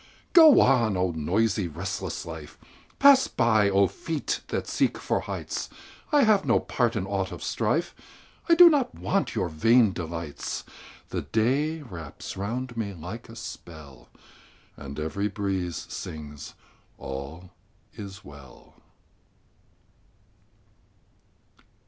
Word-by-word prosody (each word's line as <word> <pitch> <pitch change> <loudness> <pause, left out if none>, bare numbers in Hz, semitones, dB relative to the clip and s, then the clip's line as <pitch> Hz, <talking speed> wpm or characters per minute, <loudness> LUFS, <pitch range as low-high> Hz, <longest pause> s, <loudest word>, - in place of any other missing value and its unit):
Go 320 -4 +9
on, 115 -7 +3
oh, 90 -1 +1
noisy, 95 +5 0
restless 95 +4 -5
life! 80 -2 -9 0.4
Pass 275 -1 +7
by, 110 -4 +3
oh, 100 0 +4
feet 160 - -3
that - - -3
seek - - 0
for - - -1
heights! - - -5 0.4
I 295 -2 +5
have 215 -4 +4
no - - +3
part - - 0
in - - -1
aught - - -2
of - - -8
strife; - - -1 0.6
I 335 - +7
do 350 +1 +10
not 285 -6 +2
want 195 0 -1
your 90 - 0
vain 110 +6 +4
delights. 85 -4 -5 0.5
The - - -3
day 145 +8 0
wraps 85 - -8
round 120 +6 -4
me 105 -4 -3
like 90 +9 -8
a 115 - -11
spell, 80 - -10 0.7
And 70 +1 -8
every 80 +7 -2
breeze 95 -5 -3
sings, 75 -2 -8 0.4
"All 70 +7 -7 0.4
is 100 -2 -9
well." 70 -4 -14
100 Hz, 120 wpm, -26 LUFS, 80-125 Hz, 0.7 s, do